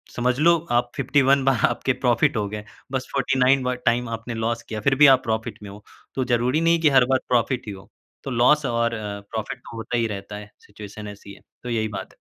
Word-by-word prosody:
समझ 125 Hz, +1 st, 0 dB
लो 170 Hz, +2 st, +5 dB
आप 120 Hz, 0 st, +1 dB
51 140 Hz, 0 st, +2 dB
बार 135 Hz, -4 st, +2 dB
आपके 130 Hz, -, -1 dB
प्रॉफिट 120 Hz, -2 st, +1 dB
हो 105 Hz, -, -1 dB
गए। 105 Hz, 0 st, -6 dB, 0.3 s
बस 130 Hz, -1 st, -3 dB
49 135 Hz, -1 st, +2 dB
बार 125 Hz, 0 st, -1 dB
टाइम 120 Hz, 0 st, +1 dB
आपने 115 Hz, +1 st, -5 dB
लॉस 115 Hz, +1 st, -2 dB
किया, 110 Hz, -, -6 dB
फिर 135 Hz, +4 st, +2 dB
भी 150 Hz, +2 st, +7 dB
आप 130 Hz, -1 st, +5 dB
प्रॉफिट 110 Hz, -1 st, -3 dB
में 105 Hz, -, -8 dB
हो। 100 Hz, +1 st, -12 dB, 0.3 s
तो 130 Hz, -, 0 dB
जरूरी 125 Hz, +6 st, +1 dB
नहीं 165 Hz, 0 st, +4 dB
हैं 170 Hz, -, +1 dB
कि 155 Hz, -, +5 dB
हर 130 Hz, -3 st, +5 dB
बार 130 Hz, -, +3 dB
प्रॉफिट 125 Hz, +1 st, +1 dB
ही -, -, -4 dB
हो। 95 Hz, -, -13 dB, 0.3 s
तो 135 Hz, -, -5 dB
लॉस 140 Hz, +5 st, +3 dB
और 115 Hz, -1 st, 0 dB
अ, 105 Hz, -2 st, -5 dB
प्रॉफिट 110 Hz, +2 st, -4 dB
तो 120 Hz, -, -12 dB
होता 115 Hz, +2 st, -3 dB
ही 115 Hz, -, +1 dB
रहता 105 Hz, 0 st, -7 dB
है, 105 Hz, 0 st, -10 dB
सिचुएशन 105 Hz, 0 st, -10 dB
ऐसी 100 Hz, 0 st, -11 dB
है। -, -, -16 dB, 0.2 s
तो 125 Hz, -, -5 dB
यही 110 Hz, -2 st, 0 dB
बात 95 Hz, -, -8 dB
है। -, -, -29 dB
120 Hz, 240 wpm, -23 LUFS, 110-135 Hz, 0.3 s, भी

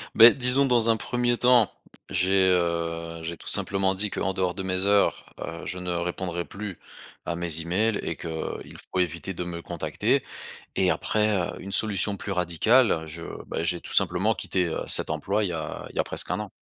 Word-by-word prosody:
Beh 115 Hz, +1 st, +9 dB
disons 130 Hz, +1 st, +5 dB
dans 120 Hz, -3 st, +4 dB
un 115 Hz, -, +3 dB
premier 120 Hz, +1 st, -1 dB
temps, 125 Hz, -4 st, +4 dB, 0.4 s
j'ai, 95 Hz, +1 st, +2 dB
heu, 85 Hz, -2 st, -1 dB
j'ai 85 Hz, +1 st, -5 dB
tout -, -, -13 dB
simplement 95 Hz, -1 st, +2 dB
dit 105 Hz, +2 st, -1 dB
qu'en 95 Hz, -, -2 dB
dehors 90 Hz, -1 st, -1 dB
de 95 Hz, -, -5 dB
mes 95 Hz, 0 st, 0 dB
heures, 100 Hz, 0 st, +1 dB
heu, 85 Hz, 0 st, -7 dB
je 90 Hz, -, -5 dB
ne 90 Hz, 0 st, -5 dB
répondrai 85 Hz, 0 st, -3 dB
plus 100 Hz, -2 st, -8 dB, 0.5 s
à 85 Hz, -, -2 dB
mes 85 Hz, -2 st, +3 dB
emails 100 Hz, +6 st, 0 dB
et 85 Hz, -, -3 dB
qu'il 80 Hz, 0 st, -6 dB
faut 95 Hz, -, -1 dB
éviter 85 Hz, +2 st, -2 dB
de 90 Hz, -, -4 dB
me 85 Hz, -1 st, -6 dB
contacter. -, -, -1 dB, 0.5 s
Et 95 Hz, -1 st, +3 dB
après, 105 Hz, +1 st, +1 dB
heu, 90 Hz, -2 st, -3 dB
une 100 Hz, -, -8 dB
solution 105 Hz, -1 st, 0 dB
plus 100 Hz, -, -5 dB
radicale, 90 Hz, +2 st, +2 dB
je 80 Hz, +2 st, -8 dB, 0.3 s
beh 80 Hz, -, -3 dB
j'ai 85 Hz, 0 st, -1 dB
tout -, -, -7 dB
simplement -, -, +3 dB
quitté, 90 Hz, -1 st, -1 dB
heu, -, -, -3 dB
cet -, -, +3 dB
emploi 100 Hz, +7 st, -1 dB
il 95 Hz, -, 0 dB
y -, -, -4 dB
a 80 Hz, -2 st, -5 dB
il -, -, -14 dB
y -, -, -1 dB
a -, -, 0 dB
presque -, -, 0 dB
un -, -, -1 dB
an. -, -, -6 dB
95 Hz, 205 wpm, -25 LUFS, 85-105 Hz, 0.5 s, Beh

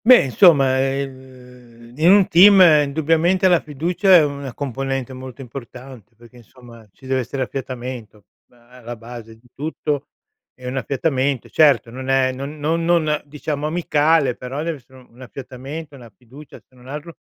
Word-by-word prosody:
Beh 250 Hz, +1 st, +7 dB
insomma, 135 Hz, -2 st, +4 dB
ehm, 130 Hz, -3 st, -7 dB
v 135 Hz, -, -16 dB
in 165 Hz, +3 st, +4 dB
un 195 Hz, -1 st, +5 dB
team 195 Hz, +3 st, +7 dB, 0.3 s
indubbiamente 165 Hz, +6 st, +1 dB
la 175 Hz, -2 st, +4 dB
fiducia 175 Hz, +6 st, +1 dB
è 165 Hz, -, +7 dB
una 140 Hz, -2 st, -6 dB
componente 135 Hz, 0 st, -4 dB
molto 130 Hz, 0 st, -10 dB
importante, 125 Hz, -2 st, -11 dB
perché 120 Hz, +2 st, -18 dB
insomma, 120 Hz, -1 st, -17 dB
ci 130 Hz, -, -20 dB
deve 130 Hz, 0 st, -1 dB
essere 130 Hz, +2 st, -3 dB
affiatamento, 125 Hz, -5 st, -7 dB, 0.3 s
ma 120 Hz, -1 st, -26 dB
alla 120 Hz, -1 st, -10 dB
base 115 Hz, -1 st, -11 dB
di 120 Hz, +2 st, -25 dB
tutto 150 Hz, -1 st, -4 dB, 0.5 s
è 130 Hz, -, -14 dB
un 125 Hz, +1 st, -4 dB
affiatamento. 135 Hz, 0 st, -2 dB
Certo 145 Hz, -6 st, +3 dB
non 130 Hz, +2 st, -8 dB
è 135 Hz, -1 st, +2 dB
non 140 Hz, +4 st, -7 dB
non 160 Hz, 0 st, 0 dB
diciamo 150 Hz, 0 st, -4 dB
amicale, 155 Hz, -4 st, +1 dB
però 130 Hz, +4 st, -6 dB
deve 165 Hz, -2 st, -3 dB
essere 130 Hz, 0 st, -20 dB
un 120 Hz, +2 st, -20 dB
affiatamento, 135 Hz, +4 st, -9 dB
una 120 Hz, -4 st, -14 dB
fiducia 130 Hz, +7 st, -15 dB
se -, -, -36 dB
non 125 Hz, 0 st, -18 dB
altro 150 Hz, +5 st, -8 dB
135 Hz, 160 wpm, -20 LUFS, 125-150 Hz, 0.5 s, Beh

